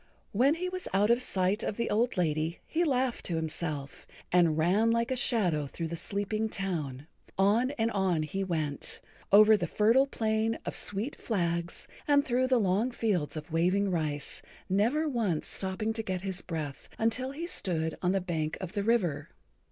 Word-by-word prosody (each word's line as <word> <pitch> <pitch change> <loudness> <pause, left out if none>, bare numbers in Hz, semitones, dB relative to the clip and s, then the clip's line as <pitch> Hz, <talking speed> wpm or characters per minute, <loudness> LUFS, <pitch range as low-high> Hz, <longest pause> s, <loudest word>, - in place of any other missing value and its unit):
When 265 +8 +3
he 360 +2 -3
was 370 0 -5
out 205 +3 +4
of 240 +1 +3
sight 195 -2 +1
of 205 - -3
the 235 - 0
old 225 +1 +1
lady 160 -1 0
he 335 +2 0
laughed 260 -5 0
to 170 - -1
himself, 155 -3 -4 0.2
and 170 -3 +4
ran 190 +8 +3
like 230 +2 +1
a - - +1
shadow 180 - +1
through 165 +3 -5
the 170 - -3
sleeping 205 +5 -2
town. 155 -10 -3 0.3
On 210 +6 +3
and 225 0 +1
on 185 -6 +1
he 195 +6 -3
went, 155 -6 -1 0.3
over 215 +2 +8
the 205 - -1
Fertile 230 +6 +4
Plain 220 -2 0
of - - -4
Sweet 210 +7 -2
Flags 170 -5 -2 0.2
and 285 -1 +4
through 255 0 +1
the 255 -1 +3
long 205 +4 +2
fields 200 -11 -1
of 155 +2 -8
waving 185 +5 +2
rice, 150 -4 -2 0.3
never 235 +12 +2
once 220 - -1
stopping 195 +3 -2
to 225 - -2
get 185 -4 -3
his 190 -2 -4
breath 155 -5 -5
until 230 +4 0
he 300 +5 -5
stood 165 - -1
on 180 - +2
the 195 - +2
bank 160 -4 -2
of 185 -3 -5
the 205 -1 -2
river. 200 -8 +1
195 Hz, 180 wpm, -30 LUFS, 170-230 Hz, 0.3 s, over